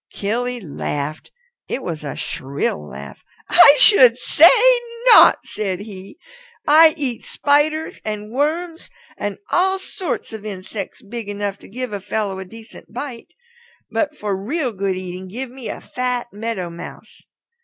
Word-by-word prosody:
Killy 245 +4 -2
laughed. 150 -4 -5 0.4
It 270 - -4
was 160 -4 -5
a 145 - -5
shrill 130 - -3
laugh. 70 0 -10 0.3
"I 285 - +8
should 250 - +7
say 315 +6 +6 0.6
not," - - +8
said 195 -3 -4
he. 200 -2 -10 0.5
"I 315 +1 +7
eat 260 -6 -3
spiders 300 +2 0
and 210 0 -5
worms 320 +6 -2 0.3
and 205 -2 -4
all 380 +2 +2
sorts 375 - -5
of 220 -2 -7
insects 200 +2 -7
big 220 0 -7
enough 205 -1 -4
to - - -15
give 250 +1 -5
a 200 - -4
fellow 200 -1 -3
a 190 - -7
decent 225 +4 -14
bite. 245 0 -7 0.6
But 300 -1 -1
for 205 -2 -2
real 250 - -2
good 195 -2 -2
eating 185 0 -7
give 245 +6 -6
me 255 -2 -7
a - - -5
fat 250 -2 -3
Meadow 205 -5 -4
Mouse. 170 - -11
220 Hz, 145 wpm, -20 LUFS, 190-265 Hz, 0.6 s, I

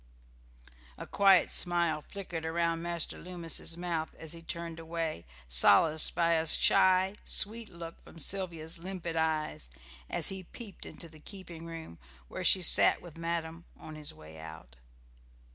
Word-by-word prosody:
A - - -7
quiet 195 -3 +4
smile 170 -3 +2
flickered 175 -3 -7
around 165 0 -1
Master 170 -1 -3
Loomis's 170 -2 -4
mouth 170 -3 -3
as 160 -2 -7
he 165 - -9
turned 170 0 -6
away, 165 - -4 0.2
solaced 100 - +5
by 170 -1 +2
a 160 0 0
shy, 185 +4 +4
sweet 225 +2 0
look 170 -1 -10
from - - -15
Sylvia's 170 -1 -1
limpid 175 -2 -6
eyes, 155 - -1 0.4
as - - 0
he 190 0 -5
peeped 215 +1 -7
into 170 - -7
the 155 -1 -16
keeping 170 -1 -10
room, 165 - -9 0.3
where - - -6
she 185 - +5
sat - - +6
with 175 -3 -13
madam, 165 0 -4
on 155 - -10
his 155 -1 -4
way 80 +1 -14
out. 80 -6 -11
165 Hz, 145 wpm, -30 LUFS, 160-175 Hz, 0.4 s, sat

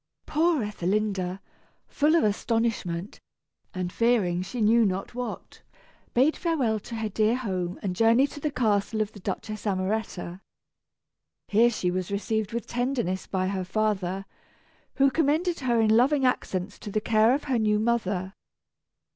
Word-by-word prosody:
Poor 315 -3 +2
Ethelinda, 195 -2 -1 0.5
full 305 +2 +2
of 335 - +4
astonishment, 210 -4 -1 0.5
and 180 -1 -4
fearing 215 -7 +2
she 195 +6 -5
knew 225 +2 +4
not 195 +1 -1
what, 250 0 -6 0.5
bade 270 +6 +4
farewell 270 -11 0
to 230 +3 -8
her 220 -1 -2
dear 215 +2 +1
home 185 -8 -3
and 185 -3 -2
journeyed 230 +7 +4
to - - -8
the 300 - -1
castle 220 -4 0
of 215 -1 0
the 205 - -12
Duchess 210 +3 -5
Amoretta. 190 -2 -2 1.1
Here 225 +4 +5
she 185 -6 -1
was 185 0 -2
received 210 +1 -1
with 235 0 -3
tenderness 240 -7 -2
by 185 -1 -1
her 190 -1 -2
father, 195 -1 -1 0.7
who 275 -1 +4
commended 325 +4 +1
her 240 -3 +1
in 220 -1 +4
loving 265 +3 +3
accents 195 -5 -1
to - - -7
the 215 - 0
care 220 +3 +3
of 290 - -4
her 260 -5 0
new 210 -1 +2
mother. 205 -4 -1
215 Hz, 150 wpm, -26 LUFS, 190-240 Hz, 1.1 s, Here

